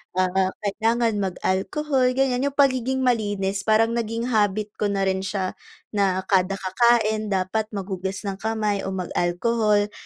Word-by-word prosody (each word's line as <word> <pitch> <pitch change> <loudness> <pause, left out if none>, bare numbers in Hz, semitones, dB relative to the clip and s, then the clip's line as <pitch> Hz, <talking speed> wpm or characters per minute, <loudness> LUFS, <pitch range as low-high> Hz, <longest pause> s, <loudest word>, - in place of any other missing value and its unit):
ah, 185 +1 +2 0.2
kailangan 225 +1 +1
mag-alkohol 250 - 0
ganiyan. 265 0 +1
Yung 280 - -4
pagiging 260 -1 +2
malinis 205 -5 0
parang 225 +1 +4
naging 235 +1 -2
habit 210 -1 +1
ko 210 - +1
na 195 -1 0
rin 190 0 +1
siya 190 -1 -2 0.4
na 190 -3 +1
kada 190 0 +1
kakain 215 +2 +2
dapat 200 +2 -1
maghugas 190 0 -4
ng 195 -1 -4
kamay 215 -2 -1
o 190 - -3
mag-alkohol. 205 +4 +1
210 Hz, 135 wpm, -23 LUFS, 190-230 Hz, 0.4 s, parang